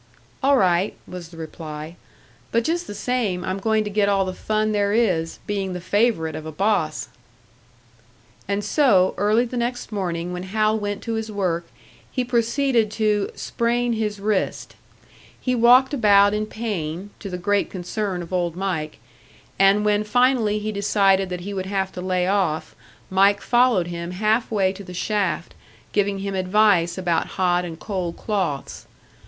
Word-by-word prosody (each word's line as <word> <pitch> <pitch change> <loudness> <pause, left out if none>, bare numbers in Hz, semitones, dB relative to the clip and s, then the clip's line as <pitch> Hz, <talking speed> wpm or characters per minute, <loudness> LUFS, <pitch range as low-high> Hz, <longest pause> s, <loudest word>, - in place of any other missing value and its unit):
"All 275 0 +4
right," 185 -1 +2
was 180 -2 -8
the 165 - -14
reply. 155 0 -7 0.6
"But 230 0 +2
just 340 +6 -1
the 205 - -6
same, 215 -9 -1
I'm 185 +1 -2
going 220 +1 +1
to 210 - -4
get 200 0 +2
all 195 -1 +2
the 185 - -3
fun 215 +3 -1
there 205 -1 +1
is, 180 -8 +1
being 195 -2 -2
the 180 - -4
favourite 190 -4 +1
of 155 - -6
a - - -5
boss!" 190 -3 0 1.4
And 200 +1 -1
so, 205 -6 +3
early 215 +5 +2
the 245 +1 -5
next 240 0 -3
morning 180 -3 -3
when 180 - -4
Hal 215 +3 +1
went 205 -1 -4
to 230 - -3
his 220 -1 -3
work 175 -4 -1 0.4
he 255 - -1
proceeded 235 -1 +1
to 210 -2 +1
"sprain 240 0 0
his 210 -2 -2
wrist." 205 -1 -1 0.6
He 255 - -1
walked 250 +3 +5
about 205 -5 +5
in 215 0 -1
pain, 200 -5 -4
to 200 - -6
the 180 - -4
great 205 +2 0
concern 185 0 -3
of 170 - -10
Old 175 -2 0
Mike; 175 -5 -3 0.6
and 195 +2 +5
when 210 0 +2
finally 235 -1 +2
he 215 +1 -3
decided 195 -2 +2
that 180 -1 -4
he 200 +3 -5
would 190 -1 -3
have 190 -1 -1
to 180 - -7
lay 185 -1 0
off, 185 -5 0 0.4
Mike 200 +1 +4
followed 240 -7 +3
him 170 0 -5
half 215 +5 +1
way 195 -3 +1
to 200 +1 -10
the 180 -1 -9
shaft, 205 +1 -1 0.4
giving 200 -1 +1
him 195 0 -4
advice 185 -2 +3
about 175 -3 0
hot 180 -1 +2
and 165 -2 -7
cold 185 -5 -4
cloths. 185 -10 -3
200 Hz, 170 wpm, -23 LUFS, 180-215 Hz, 1.4 s, walked